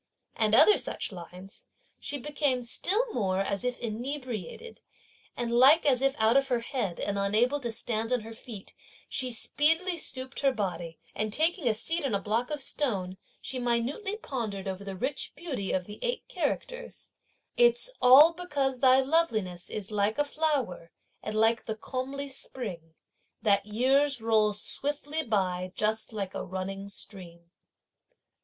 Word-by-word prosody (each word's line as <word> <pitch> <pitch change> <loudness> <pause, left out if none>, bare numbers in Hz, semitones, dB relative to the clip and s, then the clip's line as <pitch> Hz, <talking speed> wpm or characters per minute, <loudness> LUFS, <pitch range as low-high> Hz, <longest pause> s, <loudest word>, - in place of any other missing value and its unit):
and 215 -1 +3
other 420 - +7
such - - -2
lines, 180 +1 -11 0.3
she 285 - -1
became 280 -2 0
still 375 - +1
more 190 -3 0
as 200 +1 -1
if 250 0 -1
inebriated, 245 - -5 0.6
and 240 -1 -2
like 265 +7 +6
as 260 -3 +3
if 275 0 +2
out 220 +2 +3
of 275 0 +4
her 245 -3 0
head, 230 -8 -3
and 200 0 -1
unable 225 +8 +2
to 240 -4 -4
stand 225 +1 -1
on 250 -2 +2
her 225 +1 -9
feet, 220 -3 -8 0.3
she 255 -1 0
speedily 325 +9 +2
stooped 260 -5 -2
her 275 -1 +3
body, 175 -8 -4 0.2
and, 215 0 -2
taking 320 - +2
a 225 - +4
seat 330 +9 -2
on 260 -7 0
a - - +1
block 225 +5 -1
of 300 -1 -3
stone, 205 -10 -1 0.3
she 260 - -4
minutely 245 - -1
pondered 215 - -4
over 190 +1 -4
the 195 -1 -6
rich 265 +9 -3
beauty 270 - -3
of 185 -1 -1
the 210 +2 -10
eight - - -2
characters: - - -4 0.4
It's 485 +1 +4
all 280 +7 +8
because 285 -7 -2
thy 260 0 +6
loveliness 225 - 0
is 210 0 -6
like 210 +1 +1
a 290 - +2
flower 280 - -1 0.3
and 215 - -5
like 225 +1 +3
the 220 - -2
comely 265 +5 -4
spring, 185 -12 -6 0.5
That 205 -1 +3
years 265 +5 +2
roll 220 -2 +2
swiftly 290 +8 -2
by 185 -7 -1
just 215 +2 0
like 200 -4 -4
a - - -4
running 195 +2 -5
stream. 170 -4 -10
235 Hz, 160 wpm, -28 LUFS, 200-280 Hz, 0.6 s, all